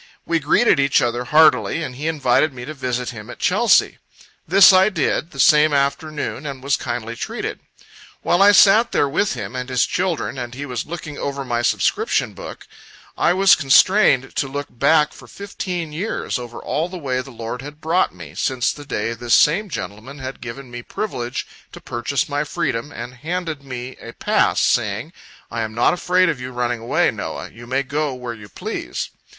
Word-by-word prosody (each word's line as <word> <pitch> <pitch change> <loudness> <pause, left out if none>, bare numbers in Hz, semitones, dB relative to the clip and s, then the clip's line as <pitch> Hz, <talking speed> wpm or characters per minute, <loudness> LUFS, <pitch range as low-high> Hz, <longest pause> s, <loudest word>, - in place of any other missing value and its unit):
We 165 -1 +1
greeted 155 +5 +3
each 140 0 +3
other 120 -1 -1
heartily, 155 +2 +4
and 130 -5 -6
he 150 +5 -4
invited 145 -1 +2
me 125 -1 -7
to 155 - -6
visit 125 -3 -3
him 105 -3 -10
at - - -9
Chelsea. - - +3 0.5
This 195 +3 +8
I 190 +2 +5
did, 165 -3 -1
the 140 - -12
same 150 +2 +5
afternoon, 140 +1 -1
and 135 -2 -7
was 140 0 +2
kindly 120 -2 -4
treated. - - -5 0.6
While 175 - +2
I 200 +1 +8
sat 205 +3 +6
there 145 - +3
with 160 +5 0
him 105 0 -6
and 125 0 -4
his 125 -2 +2
children, 175 -7 -2
and 120 0 -6
he 140 +2 -5
was 125 -4 -4
looking 155 -3 -7
over 140 -1 -3
my 120 -1 -1
subscription - - +1
book, - - -10 0.5
I 175 - +2
was 195 +1 +6
constrained 140 -1 +4
to 140 - 0
look 145 +1 -5
back 150 +5 +3
for - - -14
fifteen 180 -5 -5
years, 175 - -3
over 120 -1 -8
all 160 +4 -2
the 185 - -7
way 130 -5 -2
the 130 - -11
Lord 115 0 -6
had 145 +2 -10
brought 165 +4 +1
me, 85 -5 -11
since 125 +6 0
the 145 - -11
day 115 -4 -2
this 120 0 +1
same 195 +8 +3
gentleman 110 - -7
had 130 -1 -7
given 125 +2 -8
me 120 0 -6
privilege 125 - -4 0.3
to - - -9
purchase 120 +3 -2
my 145 0 -1
freedom, 150 -4 -3
and 120 -1 -7
handed 160 0 -4
me 125 -1 -7
a 115 - -9
pass, - - +1
saying, - - 0 0.4
"I 115 - -2
am 110 -1 -4
not 120 - +3
afraid 180 +1 +2
of 150 -6 -1
you 125 0 -6
running 120 -1 -2
away, 115 - +1
Noah - - -6
you 120 +1 -13
may 130 +2 0
go 145 0 -2
where 125 -2 -6
you 105 -2 -12
please." - - -5
140 Hz, 190 wpm, -20 LUFS, 120-160 Hz, 0.6 s, This